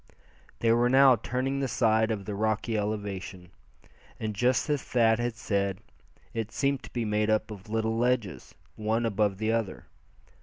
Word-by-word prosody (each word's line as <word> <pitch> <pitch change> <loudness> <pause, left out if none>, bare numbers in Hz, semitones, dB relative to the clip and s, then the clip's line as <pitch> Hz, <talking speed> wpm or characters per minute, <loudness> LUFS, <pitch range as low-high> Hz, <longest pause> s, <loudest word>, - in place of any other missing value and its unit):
They 115 - +3
were 120 +1 +3
now 135 0 +7
turning 130 +4 -2
the 135 - 0
side 110 -2 +2
of 105 -3 -3
the 105 - -4
rocky 110 +2 -1
elevation. 100 -4 -4 0.7
And 110 -1 -3
just 125 +4 +1
as 145 -3 0
Thad 115 -2 +2
had 120 -1 -1
said, 100 -4 -1 0.6
it 115 -1 -3
seemed 140 -1 0
to 115 - -12
be 120 -2 -1
made 105 0 0
up 110 0 +1
of 100 0 -10
little 110 0 0
ledges, 120 -5 -1 0.2
one 110 +2 0
above 105 -3 +1
the 110 +2 0
other. 115 -4 -2
110 Hz, 165 wpm, -28 LUFS, 105-120 Hz, 0.7 s, now